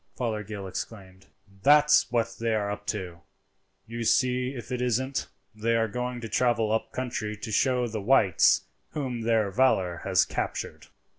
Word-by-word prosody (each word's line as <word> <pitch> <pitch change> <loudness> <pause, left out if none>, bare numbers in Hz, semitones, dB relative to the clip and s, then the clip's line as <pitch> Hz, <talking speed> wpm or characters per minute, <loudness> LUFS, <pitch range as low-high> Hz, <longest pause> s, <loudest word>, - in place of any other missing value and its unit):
Fothergill 105 -4 -4
exclaimed. 95 -1 -8 0.3
"That's 150 +1 +5
what 115 -1 0
they 115 -1 0
are 100 -1 -1
up 105 0 -7
to; 90 -3 -4 0.6
you 115 +1 -5
see 125 +2 +1
if 120 +1 -9
it 125 -1 -2
isn't. 130 +2 -1 0.3
They 115 +2 0
are 115 -1 +2
going 125 +2 -4
to 115 - -5
travel 115 -2 +1
up 110 - -1
country 120 -4 -4
to 110 +2 -6
show 125 +2 +2
the 110 -2 -4
whites 105 -3 +4 0.3
whom 130 -5 -3
their 110 -3 +1
valour 95 -7 +2
has 95 -3 +3
captured." - - -4
115 Hz, 155 wpm, -27 LUFS, 105-125 Hz, 0.6 s, That's